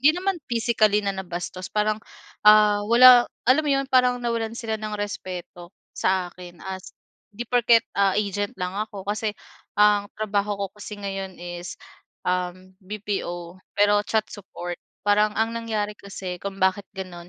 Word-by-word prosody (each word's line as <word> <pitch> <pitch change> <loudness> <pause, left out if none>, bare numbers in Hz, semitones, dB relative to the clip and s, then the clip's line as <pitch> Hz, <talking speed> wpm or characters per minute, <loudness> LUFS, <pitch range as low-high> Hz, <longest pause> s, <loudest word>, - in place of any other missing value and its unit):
hindi 305 +6 +5
naman 375 -1 -1
physically 220 -3 +2
na 200 - 0
nabastos 185 -1 -5
parang, 215 0 0 0.5
ah, 210 -1 +7
wala 245 +1 +8 0.2
alam 255 +5 +5
mo 300 - -2
'yon, 275 0 +2
parang 250 -1 +5
nawalan 230 -1 -1
sila 220 -2 -3
ng 215 -1 -4
respeto 180 -4 -6 0.2
sa 185 -1 0
akin 175 -1 -12
as 190 -1 -7 0.3
'di 220 +3 -6
porket, 235 -1 +4
ah, 200 -1 +2
agent 205 -1 -1
lang 180 -1 -3
ako. 205 -1 -5
Kasi, 210 +1 -2 0.4
ang 205 -1 +4
trabaho 205 -1 -1
ko 200 0 -2
kasi 210 0 -7
ngayon 195 -2 -5
is, 175 0 -7 0.5
um, 180 +1 -2
BPO 185 -3 -5 0.2
pero 205 0 +4
chat 220 -1 +2
support, 175 -3 -7 0.2
parang 210 +1 +3
ang 225 +1 +1
nangyari 220 -3 -2
kasi 190 -3 -7
kung 200 -1 -5
bakit 190 +1 +1
gano'n, 175 -2 -7
205 Hz, 155 wpm, -24 LUFS, 185-220 Hz, 0.5 s, wala